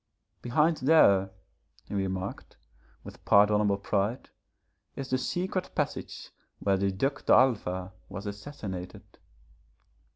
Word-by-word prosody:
'Behind 150 +7 +2
there,' 100 -10 +5 0.6
he - - -9
remarked, 95 -1 -4 0.5
with - - -12
pardonable 105 0 +4
pride, 100 +4 -2 0.6
'is 135 -1 -6
the 130 - +3
secret 185 +6 -2
passage - - -4 0.3
where 100 -1 +1
the 100 +1 0
Duc 135 +8 -2
d'Alva 95 -8 +2 0.2
was 100 +2 -7
assassinated.' 100 -4 -8
105 Hz, 100 wpm, -28 LUFS, 95-135 Hz, 0.6 s, there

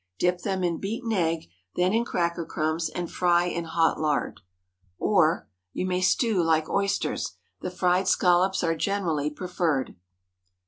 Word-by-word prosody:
Dip 180 - +1
them 190 -1 -2
in 170 -2 0
beaten 225 +4 -3
egg, 165 -5 0 0.3
then 180 +2 +2
in 230 +1 +2
cracker 170 -4 -1
crumbs 160 +1 -1
and 175 -1 -5
fry 175 -1 +3
in 170 -1 -3
hot 165 0 +1
lard. 150 -7 -1 0.6
Or, 175 -5 +2 0.3
You - - -2
may 180 0 0
stew 205 +1 +2
like 160 -1 +2
oysters. 200 0 -1 0.3
The - - -3
fried 180 +1 +1
scallops 180 +1 +3
are 165 -1 +1
generally 165 -5 -1
preferred. 160 -4 -1
175 Hz, 145 wpm, -26 LUFS, 165-190 Hz, 0.6 s, fry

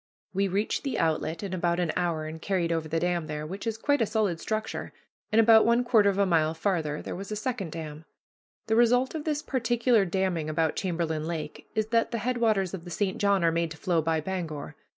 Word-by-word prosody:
We 195 +1 +1
reached 200 +3 -1
the 275 - -2
outlet 160 +1 0
in 195 -2 -4
about 175 -1 0
an 175 -3 +1
hour, 170 -3 -1
and 160 +1 -7
carried 180 -4 0
over 165 -1 -1
the 165 +1 0
dam 175 -2 -1
there, 150 0 -4
which 195 +8 -6
is 225 -1 -1
quite 285 +3 +1
a 225 - +2
solid 200 -7 0
structure, 215 +3 -3 0.4
and 215 - +4
about 225 0 +7
one 235 +1 +3
quarter 225 -4 +4
of 195 - -1
a 200 - +4
mile 160 -3 +2
farther 160 -4 -1
there - - -5
was 195 +3 -7
a - - -1
second 210 -6 -3
dam. 155 -1 -7 0.6
The 220 - +1
result 245 +2 +4
of 315 -2 -5
this 300 -2 -1
particular 240 -3 +2
damming 175 -3 -1
about 160 0 0
Chamberlain 165 -4 -2
Lake 155 -3 -5
is 215 0 0
that 230 0 +2
the 235 - -2
headwaters 220 -5 +1
of 185 -3 -5
the 175 - -9
St. 190 +2 -1
John 200 -3 +3
are 165 - +4
made 170 0 0
to 160 - -9
flow 170 -2 +1
by 160 0 0
Bangor. 165 -4 -5
185 Hz, 225 wpm, -27 LUFS, 165-220 Hz, 0.6 s, about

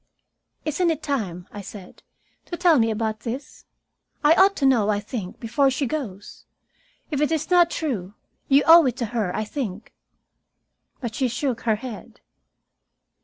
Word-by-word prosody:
"Isn't 325 +3 +1
it 320 -2 -2
time," 195 - -3
I 205 - -7
said, 195 -1 -11 0.4
"to 345 - -6
tell 340 -5 +4
me 225 0 +3
about 220 0 -2
this? 245 +6 -7 0.6
I 295 +2 +7
ought 385 +3 +5
to 275 - 0
know, 235 -6 +3
I 205 -1 +1
think, 205 -3 -6
before 240 +5 +2
she 270 +2 -1
goes. 225 -9 -6 0.7
If 290 -1 -1
it 300 - +2
is 320 +1 -2
not 350 -1 +6
true, 220 - -3 0.3
you 275 +1 +5
owe 330 -2 +8
it 245 -1 -2
to 245 - -1
her, 215 -6 0
I 215 - -1
think." 215 -3 -5 1.1
But 235 -3 -4
she 260 +2 0
shook 245 0 -2
her 220 -2 +1
head. 220 -1 -9
250 Hz, 165 wpm, -23 LUFS, 215-295 Hz, 1.1 s, owe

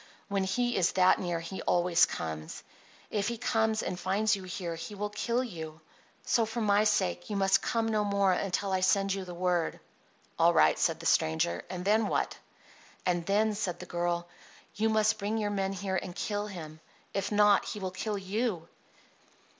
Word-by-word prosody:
When 200 -1 0
he 240 +5 0
is 180 -1 +2
that 185 -1 +4
near 175 -2 -2
he 180 +3 -6
always 175 -1 +3
comes. 80 -2 -5 0.5
If 205 -1 0
he 235 0 -2
comes 220 -2 +1
and 180 - -3
finds 205 +4 +1
you 195 - -7
here 180 -2 -5
he 165 +5 -7
will 205 +1 -3
kill 235 +4 0
you. 160 -8 -7 0.5
So, 235 - +3
for 225 +2 -4
my 210 -1 +3
sake, 90 - 0
you 210 - -2
must 195 -1 +3
come 230 -1 0
no 215 -1 +1
more 200 -2 +2
until 195 +1 -1
I 190 - +2
send 195 +1 +2
you 195 -1 -4
the 175 -1 -8
word." 175 -1 0 0.6
"All - - +5
right," 75 0 +5
said - - +1
the - - -9
stranger. 80 +2 +1
"And 180 0 -5
then 215 +1 +3
what?" - - -1 0.7
"And 175 -2 0
then," 210 +2 +2
said 185 -4 -2
the 180 - -7
girl, 175 0 -2 0.5
"you 220 +1 +1
must 215 -1 +2
bring 210 +2 -1
your 210 -1 -1
men 195 -1 -1
here 195 -1 -2
and 175 -2 -8
kill 205 0 -2
him. 160 -6 -8 0.3
If 195 +1 -2
not, 210 -1 +5
he 210 - -5
will 190 -2 -3
kill 210 +3 -3
you." 195 -2 -2
195 Hz, 190 wpm, -30 LUFS, 175-210 Hz, 0.7 s, All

